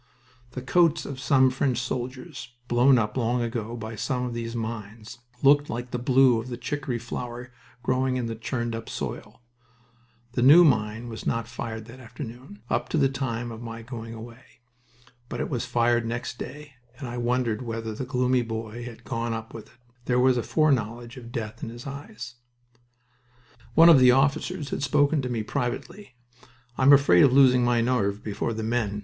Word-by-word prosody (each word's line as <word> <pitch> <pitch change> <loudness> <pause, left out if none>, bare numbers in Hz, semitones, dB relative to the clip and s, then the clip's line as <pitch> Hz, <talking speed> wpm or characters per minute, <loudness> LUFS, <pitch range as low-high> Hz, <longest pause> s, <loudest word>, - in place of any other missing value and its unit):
The 125 - -6
coats 170 +3 +3
of 135 -2 -6
some 130 0 +4
French 130 -1 0
soldiers, 125 0 -5
blown 125 +2 +5
up 110 -2 -1
long 120 0 +1
ago 115 0 -4
by 110 0 -6
some 125 +4 -2
of 125 -1 -3
these 115 0 -4
mines, 110 0 -6 0.2
looked 145 +1 +5
like 120 +1 -5
the 125 - -2
blue 125 -1 +4
of 120 - -10
the 120 -1 -5
chicory 135 -2 -3
flower 120 +1 -6 0.3
growing 130 +1 +1
in 125 - -2
the 115 - -3
churned 115 +1 -3
up 115 0 -6
soil... - - -6 0.9
The 125 - -1
new 150 +8 +8
mine 110 -3 +1
was 115 -1 -7
not 115 -1 -1
fired 110 -2 -6
that 120 +3 -12
afternoon, 120 -2 -10
up - - -1
to - - 0
the 135 -3 +3
time 120 -3 -3
of 115 0 -8
my 115 -1 -7
going 115 -1 -7
away. 115 +2 -11 0.9
But - - -5
it - - -3
was 125 -2 -1
fired 120 0 +2
next 115 +1 -4
day, 145 -1 -8 0.2
and 130 -1 -6
I 120 +1 -5
wondered 120 -2 0
whether 115 -2 -4
the 120 - -5
gloomy 125 0 +1
boy 115 0 -5
had 115 -1 -10
gone 115 0 -2
up 110 +1 -7
with 110 -2 -9
it. 120 - -24 0.3
There 125 0 +2
was 130 0 +4
a 120 - 0
foreknowledge 120 -5 0
of 120 -2 -10
death 115 -2 -5
in - - -4
his 120 +1 -10
eyes. 140 - -8 1.4
One 165 +1 +8
of 165 -5 +8
the 125 -1 +7
officers 140 +2 +1
had - - -2
spoken 145 +2 +2
to 125 - -4
me 115 -3 -2
privately. 140 - -4 0.6
"I'm 130 +3 +5
afraid 140 +3 +6
of 140 - +6
losing 130 -2 +6
my 120 -1 +2
nerve 105 -5 0
before 110 +2 -2
the 110 0 -4
men. 110 -3 -1
120 Hz, 185 wpm, -26 LUFS, 115-130 Hz, 1.4 s, new